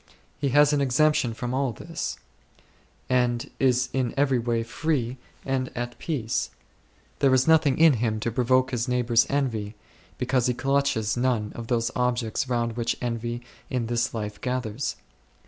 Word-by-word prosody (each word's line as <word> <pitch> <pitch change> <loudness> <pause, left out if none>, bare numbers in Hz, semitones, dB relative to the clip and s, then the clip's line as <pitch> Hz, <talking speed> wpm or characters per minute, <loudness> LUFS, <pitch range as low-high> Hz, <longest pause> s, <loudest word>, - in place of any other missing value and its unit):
He 140 - 0
has 145 +2 +5
an 145 - +2
exemption 140 -1 +2
from 125 +1 -4
all 135 -2 0
this, 165 +8 -5 0.9
and 125 -2 +1
is 125 -1 +3
in 130 -3 -1
every 135 -3 +3
way 115 -1 0
free 130 0 -1 0.3
and 130 -1 -1
at 120 0 -4
peace; 125 -9 -2 0.7
there 135 - +4
is 130 +2 +2
nothing 155 -4 +4
in 165 -2 +7
him 110 -2 -1
to 120 - -1
provoke 130 +2 +2
his 120 -2 -1
neighbours' 120 -2 +3
envy, 115 -7 -1 0.4
because 125 -1 +1
he 125 - 0
clutches 135 -6 +1
none 120 -4 0
of 115 -1 -7
those 115 -1 0
objects 125 0 0
round 120 -2 -1
which 115 -1 -1
envy 120 0 -3 0.3
in 125 -4 -1
this 120 +1 0
life 105 -2 -5
gathers. 125 -1 -2
125 Hz, 155 wpm, -26 LUFS, 115-135 Hz, 0.9 s, in